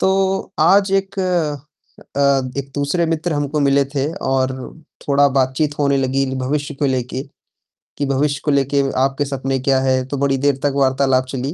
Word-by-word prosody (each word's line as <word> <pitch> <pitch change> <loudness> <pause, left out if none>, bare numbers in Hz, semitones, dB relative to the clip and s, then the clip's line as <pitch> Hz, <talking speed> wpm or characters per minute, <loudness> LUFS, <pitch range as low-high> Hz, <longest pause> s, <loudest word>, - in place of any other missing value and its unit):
तो 190 0 +1
आज 195 +4 +4
एक 195 0 -1
अ, 150 -5 -4 0.4
एक 140 0 -4
दूसरे 145 +4 0
मित्र 165 +1 -1
हमको 145 +1 -1
मिले 140 0 +3
थे 140 +3 -1 0.2
और 130 0 +1 0.6
थोड़ा 140 0 +4
बातचीत 135 +3 0
होने 140 -1 +2
लगी 135 0 +1
भविष्य 145 +3 -2
को 140 +1 -1
लेके, 130 0 -2 0.8
कि 145 - -1
भविष्य 140 +1 0
को 150 - +2
लेके 140 0 +2 0.2
आपके 135 +2 +1
सपने 135 -1 -2
क्या 135 +1 +2
है? 130 -1 +1
तो 140 - -4
बड़ी 135 0 +1
देर 140 +1 +2
तक 145 -1 +1
वार्तालाप 130 -1 +2
चली। 135 +2 -3
140 Hz, 165 wpm, -19 LUFS, 135-150 Hz, 0.8 s, आज